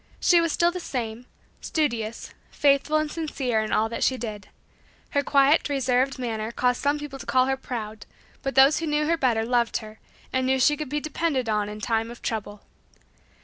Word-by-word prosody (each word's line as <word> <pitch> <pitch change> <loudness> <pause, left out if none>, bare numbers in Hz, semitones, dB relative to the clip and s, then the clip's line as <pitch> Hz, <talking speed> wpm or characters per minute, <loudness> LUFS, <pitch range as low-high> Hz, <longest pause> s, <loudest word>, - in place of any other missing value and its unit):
She 345 -1 +5
was 335 -1 0
still 345 +2 +2
the 360 - -5
same 240 -6 -5 0.3
studious, 235 -8 -2 0.2
faithful 285 +2 +2
and 310 -1 -1
sincere 270 -8 -1
in 215 - -4
all 220 - +2
that 230 - -3
she 260 - +2
did. 210 -5 -6 0.6
Her 285 - +2
quiet 280 +2 +3
reserved 265 0 +1
manner 225 -3 -3
caused 250 +1 0
some 285 +1 +1
people 290 -2 -7
to - - -8
call 255 +2 +3
her 265 0 0
proud, 220 -5 -6 0.3
but 270 - -3
those 270 +3 +6
who 330 - -3
knew 300 0 +1
her 335 +2 +2
better 240 -7 +1
loved 240 -1 +1
her, 215 -1 -10 0.3
and 260 0 +1
knew 265 0 +2
she 295 +4 +4
could 300 -2 -6
be 295 +2 -1
depended 305 -4 -1
on 210 -1 0
in 210 0 -8
time 225 0 0
of 240 - -11
trouble. 210 -2 -4
255 Hz, 195 wpm, -25 LUFS, 225-295 Hz, 0.6 s, those